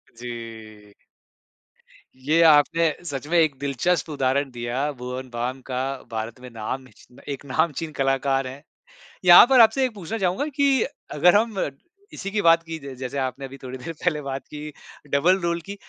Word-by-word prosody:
जी। 110 -3 -9 1.2
ये 150 +6 +1
आपने 155 +3 +4 0.2
सच 140 -3 -5
में 170 +2 +2
एक 155 -4 +2
दिलचस्प 145 +6 0
उदाहरण 140 -1 0
दिया 125 +4 -2
भुवन 125 +1 -6
बाम 125 +2 -3
का 125 0 -2 0.3
भारत 110 +2 -5
में 125 0 -10
नामची 120 +1 -8 0.2
एक 140 - -10
नामचीन 160 +3 -1
कलाकार 135 0 +1
हैं। 135 +3 -9 0.6
यहाँ 175 +4 +10
पर 265 -2 +6
आपसे 260 +4 +5
एक 250 - -3
पूछना 200 +3 -5
चाहूँगा 190 +8 0
कि 275 -4 +3 0.3
अगर 175 +5 +5
हम 215 -1 +1 0.5
इसी 195 0 -6
की 210 -1 0
बात 165 0 +5
की 165 -1 -6
ज 140 -2 -8
जैसे 130 +1 -5
आपने 130 +1 -3
अभी 135 +1 -10
थोड़ी 130 0 -6
देर 165 +6 -7
पहले 155 -4 +1
बात 135 -1 -5
की 150 0 -8 0.4
डबल 175 +7 +3
रोल 170 0 -1
की, 200 +4 -8
140 Hz, 165 wpm, -24 LUFS, 130-170 Hz, 1.2 s, यहाँ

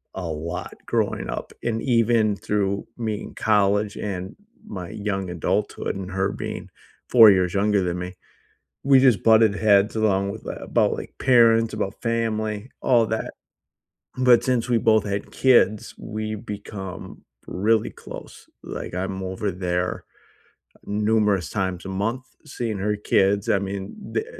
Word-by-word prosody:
a 95 - -4
lot 80 +3 -5
growing - - -1
up. - - -5
And 115 -1 -1
even 115 -4 +2
through 100 -1 -1
me 110 -3 -3
in - - -10
college 105 -1 +2
and 95 -1 -5 0.3
my 90 -4 -6
young 95 -3 -3
adulthood 90 +2 -2
and 95 -1 -6
her 95 +1 0
being - - -6 0.4
4 115 -4 +9
years 90 -2 +1
younger 100 -1 +2
than 90 0 -2
me, 90 +1 -6 0.7
we 135 -1 +6
just 125 -8 +4
butted 110 -2 +5
heads 105 0 +3
along 100 -2 +1
with 110 - -9
that - - -6
about, - - +2
like, - - -7
parents, 115 -3 +4
about 100 -2 -4
family, 110 -1 -2
all 120 -3 +4
that. 110 0 -3 0.9
But 125 -2 +5
since 125 -2 0
we 120 - +3
both 110 -1 +3
had 100 0 -4
kids, 120 -5 +5 0.3
we’ve 110 0 -4
become 95 -3 -8 0.6
really 110 -1 +3
close. - - -9 0.4
Like, - - -7
I'm 95 +1 -3
over 100 +2 -2
there 90 0 -1 1.1
numerous 105 -6 +2
times 95 -1 -2
a 95 - -5 0.2
month 130 +3 -2 0.3
seeing 115 -4 -2
her 105 +2 0 0.2
kids, 100 +1 +4
I - - +4
mean, 100 0 -4 0.3
the 430 - 0
105 Hz, 150 wpm, -23 LUFS, 95-115 Hz, 1.1 s, 4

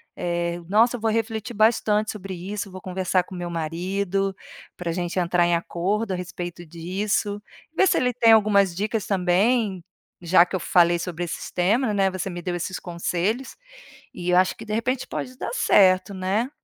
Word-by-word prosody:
eh, 170 0 -2
nossa 230 +5 +4
vou 225 0 0
refletir 225 +1 -2
bastante 215 -1 +2
sobre 195 -2 -7
isso, 200 +3 -5
vou 185 0 -9
conversar 185 0 0
com 190 - -13
meu 175 -1 -4
marido, 185 +4 -2 0.4
pra 175 -1 -3
gente 175 +1 -3
entrar 175 0 +2
em 170 0 +2
acordo 190 +5 -2
a - - -1
respeito 175 -1 -6
disso 200 +5 -2 0.3
e - - -28
ver 385 - +5
se - - +3
ele 250 -1 +2
tem 230 -1 +5
algumas 200 -4 +4
dicas 210 +2 -2
também, 195 +2 +1 0.4
já 170 +1 +6
que 180 - -5
eu - - -1
falei 175 0 +3
sobre 175 0 -4
esses 170 -2 -6
tema, 210 +6 +1
né, 195 -1 +2
você 185 +1 -4
me 175 -1 -6
deu 175 0 -3
esses 180 +1 -4
conselhos 180 +8 -2 0.6
e 175 0 -4
eu 180 - +4
acho 185 0 +3
que 225 - -9
de 215 - -4
repente 250 +3 -1
pode 255 0 -5
dar - - -4
certo, 185 - +4
né. 195 +7 -1
190 Hz, 185 wpm, -24 LUFS, 175-215 Hz, 0.6 s, já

